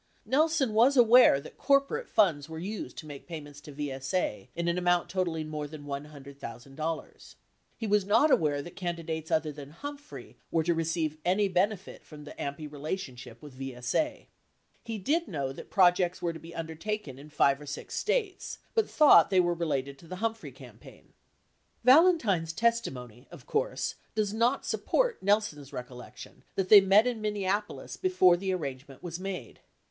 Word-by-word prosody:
Nelson 295 -3 +2
was 250 +6 +4
aware 240 - +7
that 140 - -13
corporate 280 - +1
funds 165 -9 +2
were 160 - -7
used 200 +6 -6
to - - -7
make 145 -2 -10
payments 145 -4 -9
to 150 - -11
VSA 135 - -3
in 170 0 -2
an 170 +1 +1
amount 175 -1 +1
totalling 170 -4 -2
more 150 -1 -4
than 145 -1 -10
$100,000. 140 +1 -7 0.4
He 225 - -4
was 210 -1 +2
not 225 +10 +4
aware 145 - +2
that 175 - -11
candi 170 -2 -4
dates 160 -1 -4
other 155 -1 +1
than 145 -1 -10
Humphrey 285 - -9
were 165 - +1
to 170 +2 +2
receive 160 -1 -2
any 195 +3 +2
benefit 195 +1 -1
from 150 -1 -12
the 145 - -10
AMPI 145 +1 -6
relationship 135 -6 -6
with 145 -3 -11
VSA. 135 - -2
47 - - -36 0.6
He 230 -2 -5
did 315 - 0
know 140 -5 -3
that - - -11
projects 180 -2 +3
were 170 -1 -2
to 160 - -9
be 165 +2 -12
undertaken 160 -2 -5
in 145 +2 -12
five 140 -1 +2
or 145 - -10
six 145 - -7
States, 415 -7 -2 0.2
but 445 -2 +1
thought 300 -2 +6
they 190 -2 +3
were 175 -1 +3
related 140 -5 -2
to 165 - -15
the 185 - -6
Humphrey 225 +3 -3
campaign. - - -15 0.7
Valentine's 250 - +4
testimony, 130 - -2
of - - -13
course, - - -1 0.2
does 210 -2 0
not 235 +5 +1
support - - 0
Nelson's 200 -9 0
recollec 125 0 -9
tion - - -12
that 190 -1 -1
they 205 -2 +10
met 195 +4 +5
in 240 -3 -2
Minneapolis 210 0 -2
before 365 - +4
the 190 +2 -2
arrangement 140 -6 -6
was 170 -1 -5
made. 185 - -6
175 Hz, 170 wpm, -29 LUFS, 145-215 Hz, 0.7 s, they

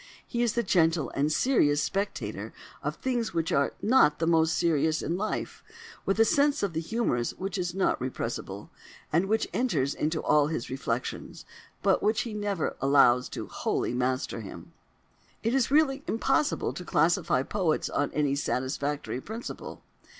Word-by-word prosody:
He 240 - -2
is 235 -2 +2
the 235 - 0
gentle 165 - +2
and 145 +2 0
serious 150 - +3
spectator 195 +6 -3 0.3
of - - -3
things 240 -7 -2
which 165 +1 0
are 140 -3 +2
not 205 - +5
the 165 - 0
most 165 -1 +3
serious 160 -2 +1
in 170 - -1
life—with 330 - -4
a 225 - +7
sense 285 -1 +2
of 195 -4 -1
the 160 - -1
humorous 165 - -1
which 190 0 -4
is 180 -2 -2
not 190 - +1
repressible, 115 -5 -5 0.4
and 170 +5 +3
which 220 +2 +1
enters 145 - +1
into 155 +1 -2
all 150 -1 +4
his 150 -7 -4
reflections, 125 -2 -4 0.4
but - - +3
which 215 +1 +2
he 230 - -5
never 205 -5 -2
allows 130 -2 +4 0.2
wholly - - -1
to - - -3
master 130 -2 -1
him. 100 - -10 0.7
It 230 +2 +1
is 265 -4 +2
really 280 -1 +3
impossible 285 +6 +1
to 180 - -7
classify 160 -4 +2
poets 180 -2 0
on 145 - -1
any 145 -2 +1
satisfactory 140 0 -2
principle. 225 - -7
165 Hz, 155 wpm, -28 LUFS, 140-220 Hz, 0.7 s, a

